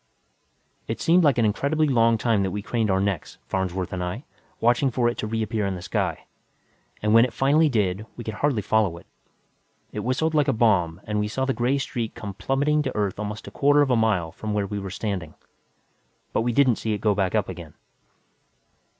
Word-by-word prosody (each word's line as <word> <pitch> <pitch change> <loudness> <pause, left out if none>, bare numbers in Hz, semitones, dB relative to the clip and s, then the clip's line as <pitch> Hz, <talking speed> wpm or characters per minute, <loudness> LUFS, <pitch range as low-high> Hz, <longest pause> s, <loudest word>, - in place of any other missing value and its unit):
_ - - -44 0.8
It - - -3
seemed 175 +2 +4
like 145 -5 +4
an 115 - +3
incredibly 140 +9 +1
long 115 -4 +3
time 110 -2 +1
that 95 - 0
we 100 +2 -4
craned 115 -1 -1
our 95 0 +2
necks, 100 -4 -2
Farnsworth 95 -1 -2
and 90 -1 -2
I, 90 +9 -4 0.4
watching 120 +4 +3
for 120 -1 +1
it 120 - 0
to - - -2
reappear 110 -1 -1
in 95 - -2
the 90 - -7
sky. - - -2 0.8
And 105 0 +2
when 115 +1 +8
it 125 - 0
finally 150 +5 +3
did, 105 -3 0
we 120 - -6
could 110 - -5
hardly 120 -1 0
follow 105 -6 +1
it. - - -14 0.9
It - - -5
whistled 145 +6 0
like 150 -2 +3
a 135 - +3
bomb 95 -7 +2
and 105 0 -2
we 105 - 0
saw 130 +5 -2
the 135 - 0
gray 125 +3 +1
streak 120 -5 -3
come 100 -2 -6
plummeting 135 +10 +1
to 135 -3 -3
Earth 100 -2 -1
almost 105 +1 -5
a - - -8
quarter 145 +1 +4
of 135 - 0
a - - +4
mile 105 -7 +1
away - - -19
from 110 -1 -3
where 105 -1 0
we 100 +1 -4
were 95 -1 -6
standing. 95 -4 -4 1.0
But - - +2
we 120 +1 0
didn't 125 -2 +3
see 110 - -2
it - - -1
go 105 0 +2
back 95 -2 0
up - - +1
again. - - -9
110 Hz, 220 wpm, -24 LUFS, 100-130 Hz, 1.0 s, when